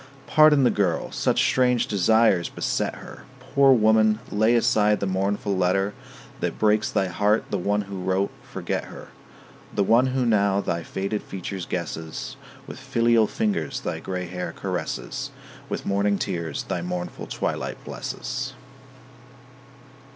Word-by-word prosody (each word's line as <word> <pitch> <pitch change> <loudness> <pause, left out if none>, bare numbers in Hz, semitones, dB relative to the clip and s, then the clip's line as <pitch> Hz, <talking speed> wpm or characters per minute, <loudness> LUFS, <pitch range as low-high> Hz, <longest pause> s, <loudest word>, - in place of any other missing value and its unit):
Pardon 155 -2 +6
the 125 - +4
girl; 90 -5 0
such - - +1
strange 125 -2 +3
desires 105 -3 +3
beset - - -2
her. - - -11
Poor 140 -1 +4
woman, 110 -2 +4
lay 110 +3 +3
aside 105 -2 +3
the - - -1
mournful 100 +1 -1
letter 95 +2 +1 0.5
That - - -2
breaks 105 0 +2
thy 95 - +1
heart; 105 +4 +2
the 100 - 0
one 105 +3 +1
who 100 -2 -7
wrote, 95 +2 0
forget - - -4
her: - - -11 0.7
The 100 - +3
one 115 +6 +4
who 130 -1 0
now 100 -3 +3
thy 85 -4 -2
faded 100 +5 -3
features 95 -1 -6
guesses, 80 -2 -5 0.3
With - - -9
filial 115 -2 +3
fingers 195 - -1
thy 80 -10 -3
gray 90 +1 -4
hair 90 0 -5
caresses, - - -4 0.4
With - - -4
morning 100 +1 +1
tears 85 -7 -3
thy 90 - -3
mournful 90 0 -5
twilight - - -3
blesses. 135 0 -5
100 Hz, 140 wpm, -24 LUFS, 95-115 Hz, 0.7 s, Pardon